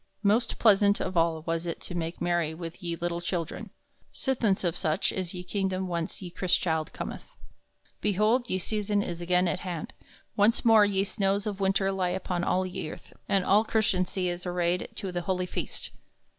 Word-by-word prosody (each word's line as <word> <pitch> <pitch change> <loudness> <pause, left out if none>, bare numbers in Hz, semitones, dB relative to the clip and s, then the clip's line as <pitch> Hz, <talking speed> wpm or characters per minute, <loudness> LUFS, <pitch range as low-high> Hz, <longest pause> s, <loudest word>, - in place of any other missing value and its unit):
Most 220 +4 +2
plaisauntest 205 -2 +5
of 185 - -4
all 165 -1 +2
was 165 +1 -2
it 170 - -3
to - - -6
make 165 -1 -3
merry 175 -3 0
with 165 +2 -7
ye 170 -1 -2
lyttle 170 0 -2
children, 170 -2 -3 0.4
sithence 230 -8 +1
of 170 -3 0
soche 155 +4 0
is 185 -2 -4
ye 180 - -5
kingdom 190 0 -1
whence 170 +2 -3
ye 175 - -7
Chrystchilde 170 -3 0
cometh. - - -7 0.7
Behold, 215 +5 +2
ye 185 - +1
season 205 +1 0
is 175 -2 -5
again 180 +1 +2
at - - 0
hand; 175 -4 -5 0.4
once 210 +4 +3
more 220 -2 +7
ye 195 -1 +1
snows 200 0 0
of 205 -2 -3
winter 195 0 +2
lie 185 -2 0
upon 180 -1 -2
all 185 +1 +1
ye 185 -4 -4
earth, - - -11 0.2
and 195 -2 +2
all 210 +2 +5
Chrystantie 190 -4 +1
is 175 0 -3
arrayed 175 0 0
to 195 - -4
the 175 0 -2
holy 180 +1 -1
feast. - - -4
185 Hz, 185 wpm, -28 LUFS, 175-200 Hz, 0.7 s, more